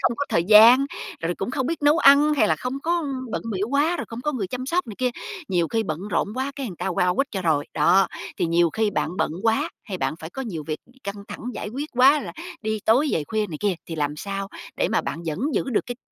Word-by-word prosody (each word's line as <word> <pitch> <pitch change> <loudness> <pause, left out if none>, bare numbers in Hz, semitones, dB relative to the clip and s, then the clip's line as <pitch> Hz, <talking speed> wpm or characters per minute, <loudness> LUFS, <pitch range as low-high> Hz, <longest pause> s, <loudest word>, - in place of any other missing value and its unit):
không 235 - +2
có 285 - -1
thời 165 - +1
gian, 225 +7 +8 0.3
rồi 170 +1 -1
cũng 195 - -4
không 260 -1 -1
biết 330 +1 -3
nấu 295 +3 +5
ăn, 295 0 +6
hay 275 - +3
là - - +2
không 255 +2 -4
có 340 +1 +1 0.3
bận - - -3
bịu 200 +3 -1
quá 300 +5 +2
rồi - - -4
không 230 +1 -6
có 295 +4 -1
người 220 -8 -2
chăm 250 +5 -5
sóc 355 +6 0
này 220 - -7
kia, 255 -1 +1 0.4
nhiều 175 -3 +1
khi 225 -1 0
bận 180 +1 -4
rộn 205 - 0
quá 265 +2 -2
cái 275 - -3
người 185 -6 -7
ta - - -2
qua 180 0 +1
quýt 275 - +1
cho 190 -3 -3
rồi. 155 -4 +1
Đó, 175 +6 +4 0.3
thì - - +1
nhiều 170 0 +3
khi 220 -1 +1
bạn - - -1
bận - - 0
quá, 230 +8 +2 0.2
hay 195 -5 -5
bạn - - -1
phải 160 - -7
có 265 - -5
nhiều 175 - -5
việc 155 -1 -3 0.3
căng 200 0 -6
thẳng - - -7
giải - - -5
quyết 280 +7 -5
quá, 270 +4 +5
là - - -7 0.3
đi 220 0 -1
tối 255 +7 +4
về 155 - 0
khuya 215 +4 -1
này 155 - -6
kia, 205 -2 +1
thì 165 - -4
làm 150 0 -1
sao 195 +3 -4 0.3
đề - - +1
mà - - +2
bạn 170 - -5
vẫn 155 0 -2 0.2
giữ - - +1
được 235 - 0
cái 245 -2 -5
220 Hz, 270 wpm, -24 LUFS, 180-270 Hz, 0.4 s, gian